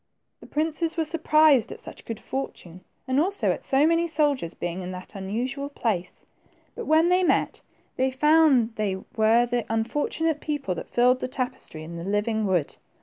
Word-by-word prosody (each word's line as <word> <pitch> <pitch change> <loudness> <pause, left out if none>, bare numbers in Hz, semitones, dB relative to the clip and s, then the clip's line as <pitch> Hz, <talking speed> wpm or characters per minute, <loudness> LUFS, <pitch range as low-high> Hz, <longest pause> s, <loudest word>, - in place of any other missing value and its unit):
The - - -14
princes 320 +2 -1
were 325 - +1
surprised 305 -5 +3
at - - -8
such - - -11
good 225 -2 -5
fortune, 185 -9 -6 0.3
and 260 +1 +1
also 390 +6 +1
at - - -4
so 275 +2 +2
many 335 +1 +2
soldiers 290 - 0
being 175 +2 -4
in 180 - -6
that 180 0 -10
unusual 245 +9 -4
place; 200 -10 -3 0.5
but 470 - -7
when 320 +2 +4
they 365 +1 +4
met, 355 - +1 0.4
they 260 +1 +2
found 275 -4 +4
they 205 -3 0 0.2
were 225 +2 +4
the 240 -1 -1
unfortunate 295 +7 -1
people 290 -11 -2
that 170 - -7
filled 250 +1 +3
the - - -3
tapestry 255 -11 -2
and 170 +1 -8
the - - -6
living 210 +2 0
wood. 175 -6 0
255 Hz, 175 wpm, -25 LUFS, 210-305 Hz, 0.5 s, when